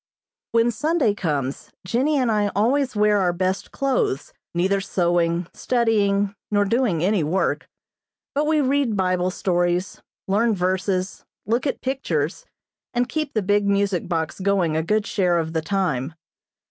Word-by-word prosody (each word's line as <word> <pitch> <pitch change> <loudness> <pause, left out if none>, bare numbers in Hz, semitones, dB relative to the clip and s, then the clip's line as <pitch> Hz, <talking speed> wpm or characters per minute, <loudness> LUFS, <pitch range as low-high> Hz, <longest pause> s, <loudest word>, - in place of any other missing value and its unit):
When 230 +1 +3
Sunday 295 -1 +1
comes, 145 -8 -3 0.2
Jennie 260 +10 +1
and 250 -4 +2
I 210 -1 +2
always 250 +5 +1
wear 210 -1 +3
our 180 -2 +2
best 185 +2 -2
clothes, 260 - -1 0.2
neither 190 +3 +1
sewing, 175 -2 +1
studying, 205 -5 +1 0.2
nor 205 -1 +2
doing 200 -7 +1
any 195 -2 +2
work, 175 +6 -1 0.6
but 295 +2 0
we 310 -1 +3
read 270 -5 +1
Bible 185 -1 +1
stories, 175 0 -1 0.3
learn 215 +3 +2
verses, 185 +1 -1 0.2
look 235 +6 0
at - - -3
pictures, 175 - -2 0.5
and 245 0 +2
keep 305 0 -3
the 215 - +1
big 205 +1 +2
music 200 -3 +1
box 165 -1 -2
going 190 -5 +1
a 160 - +2
good 210 +5 0
share 180 -4 +1
of 160 -1 -2
the 160 - 0
time. 160 -5 -1
200 Hz, 145 wpm, -23 LUFS, 175-230 Hz, 0.6 s, When